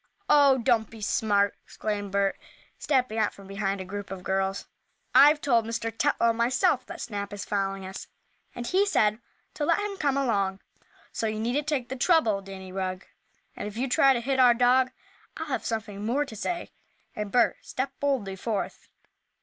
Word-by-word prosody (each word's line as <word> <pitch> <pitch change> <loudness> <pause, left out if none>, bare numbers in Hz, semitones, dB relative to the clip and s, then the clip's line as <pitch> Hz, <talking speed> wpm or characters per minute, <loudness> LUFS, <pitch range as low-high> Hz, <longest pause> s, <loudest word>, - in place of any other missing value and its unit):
"Oh, 280 -2 +6
don't 235 -3 +2
be 225 - -12
so 210 - -2
smart!" 205 -2 +2
exclaimed 205 -2 -4
Bert, 200 0 +1 0.4
stepping 255 -6 +1
out 215 - +1
from 200 - -13
behind 195 0 -2
a 190 - -5
group 200 +1 -6
of 190 -2 -7
girls. 190 +1 -1 0.5
"I've 290 +4 +7
told 240 -6 +2
Mr. 225 0 -3
Tetlow 235 -3 +2
myself 235 +3 +1
that - - -8
Snap 200 -3 -5
is 200 -1 -5
following 195 -1 -2
us, 190 +1 -7 0.5
and 240 - -5
he 375 +9 +3
said 215 - +2 0.3
to 300 - -4
let 330 +3 +3
him 410 -1 -3
come 280 -5 +1
along. 200 -8 0 0.5
So 225 - -2
you 215 0 -3
needn't 250 +7 -1
take 270 -6 -1
the 260 - -3
trouble, 250 - +3
Danny 190 -1 -9
Rugg. 185 0 -3 0.5
And - - -5
if 210 +1 -8
you 260 +3 0
try 270 +2 +5
to 240 - -1
hit 265 +2 -1
our 245 -2 +7
dog 250 +2 +4 0.5
I'll - - -4
have - - -3
something 215 -3 -4
more 260 +7 +1
to 230 - -10
say," 345 - -4 0.4
and 210 -1 -4
Bert 245 +2 +3
stepped 265 0 -4
boldly 255 -9 -1
forth. 210 0 -4
225 Hz, 185 wpm, -27 LUFS, 200-265 Hz, 0.5 s, I've